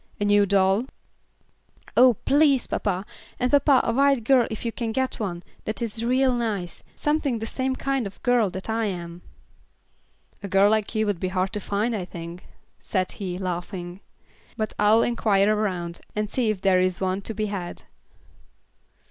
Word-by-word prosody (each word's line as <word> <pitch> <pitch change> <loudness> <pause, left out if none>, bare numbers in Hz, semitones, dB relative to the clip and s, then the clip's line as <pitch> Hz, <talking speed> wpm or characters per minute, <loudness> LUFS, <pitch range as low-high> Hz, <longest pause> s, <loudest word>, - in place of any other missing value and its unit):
A 205 - 0
new 205 0 +4
doll?" 195 +3 +3 1.1
"Oh, 250 -1 +6
please, 280 +1 +3
papa; 190 -1 -2 0.3
and 250 0 +1
papa 285 -2 +5
a 230 - 0
white 275 -1 +3
girl 250 0 +4
if 220 +1 -6
you 230 - 0
can 230 -1 -3
get 260 +3 -1
one 180 -5 -4 0.2
that 215 - -3
is 230 -1 -2
real 255 +2 +3
nice, 215 -7 -3
something 295 -4 0
the 225 - -4
same 260 +3 -2
kind 270 -4 -1
of 195 - -12
girl 245 -4 +3
that 190 +1 -7
I 225 0 0
am." 175 -3 -5 1.2
"A 200 - -5
girl 195 +2 +4
like 220 +1 0
you 220 0 +2
would 205 -4 -1
be 185 - -1
hard 185 +2 -1
to 210 - -2
find, 210 +4 -1
I 190 -4 -3
think," 170 0 -9 0.3
said 185 -2 -2
he, 185 -3 -5
laughing, 180 0 -5 0.6
"but 215 -2 -2
I'll 215 +2 +5
inquire 215 -3 +2
around 180 -5 -2 0.2
and 210 0 -2
see 245 -4 +1
if 210 -3 -2
there 190 -2 +4
is 185 0 0
one 190 +1 -1
to 220 +2 -5
be 215 - -1
had." 195 -4 -5
210 Hz, 175 wpm, -24 LUFS, 190-235 Hz, 1.2 s, Oh